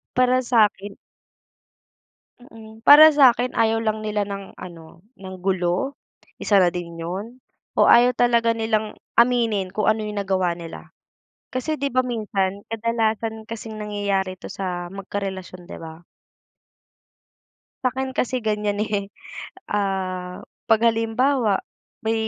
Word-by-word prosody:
Para 255 0 +3
sa'kin 210 -5 +1 1.5
Mm, 220 -2 -14
para 310 +2 +10
sa'kin 255 -4 +4
ayaw 225 0 +1
lang 215 -1 -1
nila 210 -1 -1
ng 200 -1 -8
ano 170 -1 -12 0.2
ng 190 -1 -8
gulo 190 +8 -1 0.4
isa 205 - +2
na 175 -1 +3
din 170 -1 -6
yun 205 +9 -6 0.3
o - - +6
ayaw 245 +1 +6
talaga 235 -1 +3
nilang 220 -1 -1 0.2
aminin 230 -5 +2
kung 210 +2 -1
ano 220 - -2
yung 210 -1 -5
nagawa 185 -3 0
nila. 170 -1 -10 0.6
Kasi 280 +5 -2
'di 280 0 -1
ba, 255 - +4
minsan 200 -4 -2
kadalasan 225 -1 -1
kasing 225 -1 -7
nangyayari 200 -3 -2
ito - - -9
sa 180 -3 -4
magkarelasyon, 190 -2 -6
'di - - -8
ba? 160 0 -10 1.8
Sa'kin 260 +1 -1
kasi 250 -2 -2
ganiyan, 210 -1 -1
eh. 200 -2 -3 0.6
Ah, 185 -3 -2 0.3
pag 225 0 +5
halimbawa 225 0 +1 0.4
may 220 +1 -1
210 Hz, 125 wpm, -22 LUFS, 190-230 Hz, 1.8 s, para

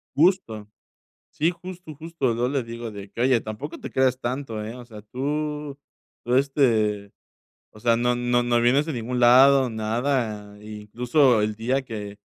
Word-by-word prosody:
Justo. 140 - +1 0.6
Sí, 160 +1 +1
justo, 180 -2 -10
justo. 155 -5 -2
Yo 120 +2 0
le 135 0 -1
digo 115 0 -7
de 100 -1 -10
que: 115 - -8
"Oye, 125 -2 +3
tampoco 110 +9 -7
te - - -8
creas 130 -1 +2
tanto, 120 -3 -4
¿eh?, 110 +2 -6
o 125 -1 -10
sea, 110 -3 -11
tú 150 +4 -4 0.5
tú, 120 - 0
este, 115 -7 +1 0.6
o 105 - -16
sea, 115 +1 +3
no 120 +1 +1
no 120 0 +1
no 120 -1 +2
vienes 130 +5 +3
de 160 - -4
ningún 125 +1 -3
lado, 130 +2 +6
nada, 110 -2 -2
i 105 0 -8
incluso 120 +3 +2
el 105 0 -1
día 125 +5 -1
que 105 -4 -7
120 Hz, 170 wpm, -24 LUFS, 110-140 Hz, 0.6 s, lado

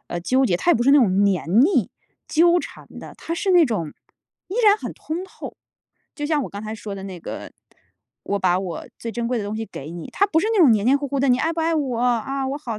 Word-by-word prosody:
呃， 175 - -3
纠 260 +9 +2
结 180 -8 +1
她 345 - +1
也 - - +5
不 235 - 0
是 275 - +4
那 285 - +7
种 200 -4 +3
粘 195 +1 +2
腻、 385 - +1 0.4
纠 340 +2 +4
缠 - - -9
的， - - -10
她 335 - -5
是 390 +2 -1
那 355 -3 +6
种 200 - -3 0.6
依 395 - -5
然 415 0 +6
很 - - -6
通 325 +3 -5
透。 380 - -10 0.6
就 295 -1 -4
像 300 -2 +1
我 - - -5
刚 200 +1 -7
才 215 0 -5
说 210 -2 -7
的 195 - -8
那 185 -2 -7
个， - - -8 0.7
我 200 - -1
把 180 -2 +2
我 185 -3 -6
最 230 -1 -6
珍 235 -1 -3
贵 250 - 0
的 210 - -4
东 210 +2 -4
西 225 - -4
给 150 -4 -9
你， 170 -1 -8
它 400 - +2
不 330 -5 +1
是 - - -1
那 440 - +1
种 295 -8 +7
黏 210 -1 +1
黏 270 +3 +5
糊 285 0 -4
糊 280 +1 -2
的， 275 - +2
你 250 - +4
爱 325 +5 0
不 330 - -3
爱 325 +1 +1
我， 265 -7 -1
啊， 250 +3 0
我 280 - -3
好 235 -7 -5
250 Hz, 285 characters per minute, -22 LUFS, 200-315 Hz, 0.7 s, 那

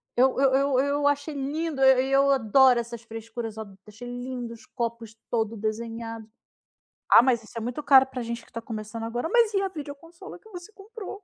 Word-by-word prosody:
Eu 260 +1 +3
eu 270 -1 +4
eu 275 -1 +2
eu 285 +1 +1
achei 285 +2 0
lindo, 290 +1 -3
eh, 265 -1 +5
e - - -4
eu 275 +1 +4
adoro 260 0 +4
essas 235 -1 -6
frescuras. 225 0 -7
Eu 220 - -4
a 200 -2 -15
achei 220 +4 -10
lindo 245 -1 -6
os 225 - -15
copos 230 -2 -5
todo 225 -1 -1
desenhado. 225 +1 -5 0.8
"Ah, - - +9
mas 240 -3 +1
isso - - -16
é - - -3
muito 245 +6 -4
caro 265 -2 +7
para 265 -1 -7
a - - -4
gente 235 0 -6
que - - -24
tá 230 - -6
começando 220 0 -6
agora", 240 +7 -3
"mas 460 -1 +3
e 390 - +2
a 390 - -1
videoconsola 320 +1 -10
que 440 - -19
você 355 0 -10
comprou?". 415 0 -10
250 Hz, 215 wpm, -26 LUFS, 230-285 Hz, 0.8 s, Ah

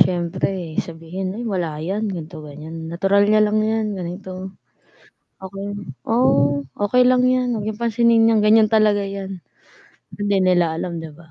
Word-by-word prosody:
siyempre 175 -1 0
sabihin 175 +4 -6
ay 240 - -5
wala 175 -8 -2
'yan 205 +5 -2
ganito 165 -5 -6
ganiyan, 155 +2 -8
natural 195 +4 +2
niya 215 0 +4
lang 210 0 +1
'yan 220 0 0
ganito. 185 +1 -7 0.9
Okey 195 +1 -6 0.4
oo, 140 - +3 0.2
okey 230 +5 +3
lang 250 0 +4
'yan 255 -1 +1
huwag 210 -2 -3
niyong 215 +1 -5
pansinin 230 0 +3
'yan 220 - +3
ganiyan 215 +1 +4
talaga 210 -2 +3
'yan. 195 -2 -6 0.8
Hindi 205 -1 +1
nila 175 -3 +2
alam 170 0 -4
'di 160 -1 -7
ba? 160 +1 -18
195 Hz, 155 wpm, -21 LUFS, 170-215 Hz, 0.9 s, niya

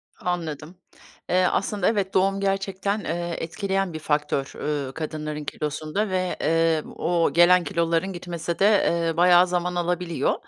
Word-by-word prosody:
Anladım. 170 -1 -4 0.5
Eee, 185 +1 +3
aslında, 200 0 0
evet, 200 -3 0
doğum 195 +1 +2
gerçekten, 195 +1 -1
eee, 170 -1 -3
etkileyen 190 +2 -2
bir 155 - -5
faktör, 150 -2 -1
ööö, 145 -3 -3
kadınların 155 -1 -5
kilosunda 155 +9 -3
ve, 185 -1 -1
eee, 165 -1 +2
o 170 -1 +1
gelen 175 +1 +6
kiloların 170 +1 0
gitmesi 170 -1 -5
de, 195 - +4
eee, 170 -5 +2
bayağı 180 +1 +6
zaman 180 0 -1
alabiliyor. 175 -1 0
175 Hz, 135 wpm, -24 LUFS, 160-190 Hz, 0.5 s, gelen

